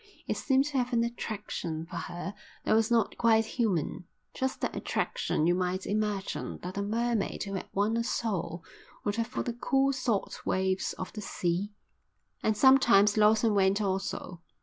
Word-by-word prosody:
It - - 0
seemed 270 0 +2
to 285 -2 0
have 250 0 -1
an 230 -1 +3
attraction 210 -8 -4
for 165 - -7
her 175 +2 -5 0.3
that - - +3
was 220 0 +3
not 235 -2 +1
quite 225 -1 +4
human, 205 - -1 0.3
just 265 0 -2
that - - -2
attraction 155 - -1
you 175 - +4
might 185 +1 -1
imagine 210 -2 -2
that 180 +1 -5
a 200 - -1
mermaid 225 +1 -1
who 200 -1 -5
had 190 - -4
won 205 +3 +1
a 230 - +1
soul 180 -8 -2 0.4
would 205 +1 -1
have 230 -1 0
for 250 - -3
the 240 - -3
cool 270 +3 +2
salt 245 -6 -2
waves 190 0 0
of 185 - -7
the 215 - -6
sea; 190 +2 -2 0.7
and 215 -1 +1
sometimes 235 -6 +6
Lawson 215 +1 +4
went 195 0 +3
also. 190 -3 -3
210 Hz, 170 wpm, -29 LUFS, 190-235 Hz, 0.7 s, sometimes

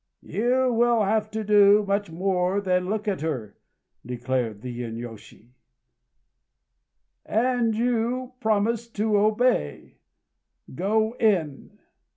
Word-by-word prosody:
"You 250 +3 +1
will 235 -1 +3
have 215 +1 0
to 220 0 -4
do 205 0 +5
much 200 -1 -1
more 180 +2 0
than 180 -2 0
look 215 +1 -2
at 195 -6 -1
her," 130 -10 -4 0.4
declared 125 -3 -3
the 120 -1 -6
inyôshi; 115 -1 -9 1.7
"and 235 -1 +1
you 245 +2 -1
promised 225 +1 0
to 215 0 +1
obey. 210 - 0 0.7
Go 220 - 0
in!" 175 -11 0
205 Hz, 105 wpm, -25 LUFS, 160-225 Hz, 1.7 s, do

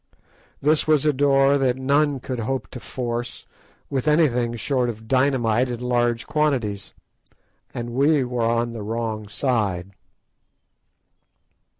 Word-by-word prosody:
This 150 +2 +3
was 155 -2 +3
a 150 - +3
door 140 0 +3
that 130 -2 +1
none 140 +1 +1
could 125 -1 -5
hope 130 +4 -2
to 125 - -8
force 120 -1 -5 0.4
with 135 +1 -2
anything 125 -7 +2
short 125 +2 0
of 110 -1 -8
dynamite 130 -2 +2
in 120 -1 -4
large 120 -1 0
quantities. 125 -10 -1 0.8
And 120 0 -5
we 140 +3 +3
were 125 -1 -3
on 115 +1 0
the 115 - -6
wrong 110 0 -3
side! 100 -6 -1
125 Hz, 125 wpm, -23 LUFS, 115-140 Hz, 0.8 s, This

